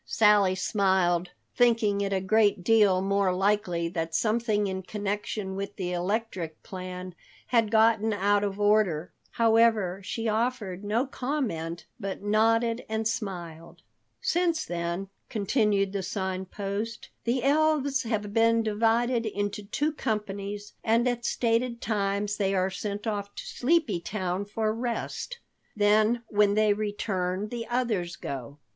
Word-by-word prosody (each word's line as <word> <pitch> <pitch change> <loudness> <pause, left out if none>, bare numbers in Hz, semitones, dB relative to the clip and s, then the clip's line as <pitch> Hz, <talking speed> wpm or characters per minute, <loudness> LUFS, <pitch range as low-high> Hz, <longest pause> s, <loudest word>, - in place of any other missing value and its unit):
Sally 205 -3 +4
smiled, 185 -3 +1 0.3
thinking 230 -4 +3
it 200 0 -1
a 195 - +1
great 205 -1 +3
deal 200 -3 +4
more 200 -1 +2
likely 180 -3 +1
that 165 -2 -3
something 215 -1 +1
in 190 -1 -3
connection 205 0 -3
with 200 +1 -5
the 180 -2 -3
electric 180 -3 -3
plan 185 -1 -7 0.3
had 230 -3 +2
gotten 220 0 +4
out 205 0 +2
of 200 0 -2
order. 205 -6 +2 0.2
However, 225 -5 +3
she 225 +3 -3
offered 215 -4 -1
no 220 +5 +1
comment 245 - -3
but 195 -2 -5
nodded 225 +3 +2
and 220 0 0
smiled. 175 -7 -5 0.4
"Since 335 -2 +1
then," 170 +2 -3 0.2
continued 205 -2 +1
the 200 - -1
Sign 190 0 -3
Post, 205 +4 -5
"the 245 +1 0
elves 285 -1 +2
have 210 -3 -3
been 230 0 +4
divided 230 +2 +1
into 205 0 -2
two 295 +9 0
companies, 205 -5 -4
and 230 +2 +3
at 240 -1 -1
stated 235 0 0
times 205 -1 -1
they 195 -1 +1
are 185 0 +1
sent 205 +2 -4
off 205 -2 -3
to - - -7
Sleepy 260 - +1
Town 185 +1 -3
for 215 +1 -1
rest. 240 - -4 0.4
Then 215 +3 +3
when 205 -1 +3
they 215 -1 +4
return 205 -2 -2
the 235 0 -5
others 220 -9 -1
go. 140 +1 -6
210 Hz, 135 wpm, -27 LUFS, 190-230 Hz, 0.4 s, Sally